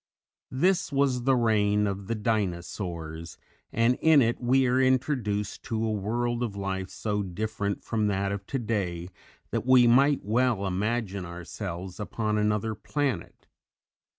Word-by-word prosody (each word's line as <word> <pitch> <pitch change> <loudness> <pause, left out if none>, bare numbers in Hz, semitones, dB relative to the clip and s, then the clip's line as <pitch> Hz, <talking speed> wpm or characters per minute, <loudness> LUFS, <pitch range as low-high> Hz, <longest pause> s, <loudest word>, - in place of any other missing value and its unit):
This 175 +6 +1
was 135 -3 +1
the 135 -1 +4
reign 105 -3 +2
of 100 -1 -3
the 115 - -1
Dinosaurs, 85 -6 -3 0.3
and 115 +2 +2
in 160 -2 +6
it 120 -1 +1
we 130 +2 +3
are 125 +1 +3
introduced 125 -6 0
to 115 -1 -1
a 110 - 0
world 120 +4 -1
of 115 -5 -2
life 95 -2 -3
so 105 -1 -2
different 100 +2 -3
from 110 -2 0
that 100 -1 0
of 100 0 -5
today 100 -9 -2 0.4
that - - -1
we 125 0 +6
might 135 +4 +4
well 115 -2 +1
imagine 100 +1 -1
ourselves 90 +1 -7
upon 105 0 -1
another 105 +1 0
planet. 135 - -3
110 Hz, 140 wpm, -27 LUFS, 100-120 Hz, 0.4 s, in